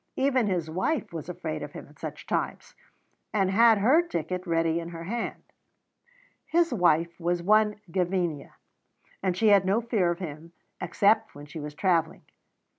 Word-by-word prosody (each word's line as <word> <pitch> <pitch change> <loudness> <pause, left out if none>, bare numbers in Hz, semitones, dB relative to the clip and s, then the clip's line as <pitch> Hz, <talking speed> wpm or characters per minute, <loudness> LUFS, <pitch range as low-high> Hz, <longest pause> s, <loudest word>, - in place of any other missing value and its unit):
Even 260 -4 +2
his 175 -5 -1
wife 185 - -2
was - - -6
afraid - - -4
of - - -7
him - - -8
at - - -21
such - - -7
times, - - -3 0.6
and 195 -2 +2
had 225 +2 +6
her 255 +12 +5
ticket 180 - -4
ready 165 0 +1
in 170 0 -6
her 165 -1 -8
hand. 230 +7 -4 1.0
His 335 -4 +2
wife 170 -4 +2
was 175 0 -1
one 210 +2 +3
Gavinia, 175 -4 -1 0.7
and 185 -2 -1
she 220 +2 +4
had 200 -2 +6
no 195 +4 +2
fear 220 -7 +1
of 170 - -1
him 165 -1 -8 0.3
except 205 -4 +2
when 145 0 -10
she 150 +2 -8
was 150 0 -7
travelling. 170 -2 0
185 Hz, 165 wpm, -27 LUFS, 165-215 Hz, 1.0 s, had